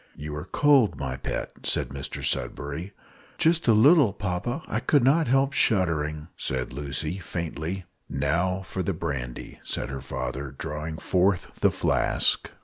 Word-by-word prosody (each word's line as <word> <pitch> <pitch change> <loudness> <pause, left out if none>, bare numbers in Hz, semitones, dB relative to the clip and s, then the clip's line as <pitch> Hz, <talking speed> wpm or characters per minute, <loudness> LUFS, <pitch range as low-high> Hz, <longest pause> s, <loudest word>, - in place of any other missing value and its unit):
"You 75 0 -6
are 75 +2 -5
cold, 140 +1 +4
my 65 -3 -2
pet," - - -4
said - - 0
Mr 70 0 -6
Sudberry. 70 +8 -1 0.5
"Just 165 -1 +3
a 115 - +7
little, 130 - +6
papa; 105 - -3
I - - -1
could 145 -4 +3
not 150 +5 +4
help 135 +2 +3
shuddering," 80 - +1
said 65 -1 -3
Lucy, 75 +5 -3
faintly. 85 +1 -4 0.2
"Now 85 +7 0
for 95 - -3
the 95 +1 -1
brandy," 70 -7 -5
said - - -3
her 70 0 -5
father, 65 +2 -4
drawing 75 +2 -4
forth 95 +1 +1
the - - +6
flask. - - +1
85 Hz, 145 wpm, -26 LUFS, 70-105 Hz, 0.5 s, a